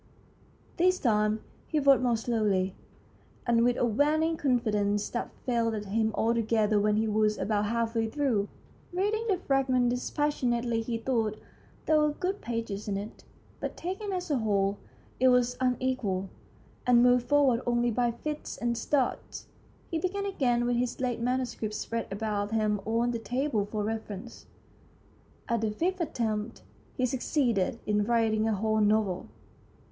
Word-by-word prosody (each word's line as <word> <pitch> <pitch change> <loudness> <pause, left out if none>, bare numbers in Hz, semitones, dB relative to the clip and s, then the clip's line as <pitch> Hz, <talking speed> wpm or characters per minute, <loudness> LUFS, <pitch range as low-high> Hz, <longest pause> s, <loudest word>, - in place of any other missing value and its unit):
This 365 +2 +4
time 215 -4 +1 0.2
he 310 - -1
wrote 275 -2 +5
more 240 -2 +2
slowly, 210 -5 0 0.7
and 235 -1 +3
with 245 0 +2
a - - +2
waning 300 +8 +2
confidence 210 -7 +1
that 240 - -3 0.2
failed 230 -4 0
him 220 +2 0
altogether 220 -2 +2
when 210 +1 +2
he 220 +1 +1
was 215 0 +2
about 205 +1 0
half 230 0 -1
way 225 -1 +1
through. 230 -6 0 0.4
Reading 415 +5 0
the 390 -4 +2
fragment 260 -6 +2
dispassionately 245 -3 0
he 230 0 -2
thought 225 -3 -1 0.5
there 310 -1 +4
were 300 0 +3
good 380 +5 -3
pages 225 -4 -4
in 200 -1 -1
it, 205 +2 -8 0.4
but, - - -5
taken 385 +3 -4
as 360 -4 -3
a 275 - +2
whole, 200 -2 +1 0.4
it 260 - +5
was 250 -1 +3
un 255 -1 +2
equal, 200 -8 -1 0.6
and 240 -1 +6
moved 245 -1 +4
forward 280 -5 +4
only 240 0 +2
by 240 +2 +1
fits 300 +6 -5
and 235 -1 -1
starts. 270 +2 -1 0.5
He 330 - 0
began 400 +3 -2
again 245 -11 +1
with 240 0 +1
his 245 0 -1
late 250 -2 -1
manu 255 +2 +1
script 215 -3 -5
spread 230 +2 -3
about 205 0 -2
him 210 -2 +1
on 230 +2 +1
the 235 - -2
table 245 -2 -1
for 210 0 -3
reference. 220 0 -6 1.0
At 235 -2 0
the 220 - +1
fifth 355 - -1
attempt 225 -7 -2 0.3
he 255 - +2
succeeded 245 -5 0
in 210 0 +2
writing 225 -1 +2
a 220 - +1
whole 215 +2 +1
novel. 210 -3 +1
235 Hz, 155 wpm, -29 LUFS, 215-260 Hz, 1.0 s, and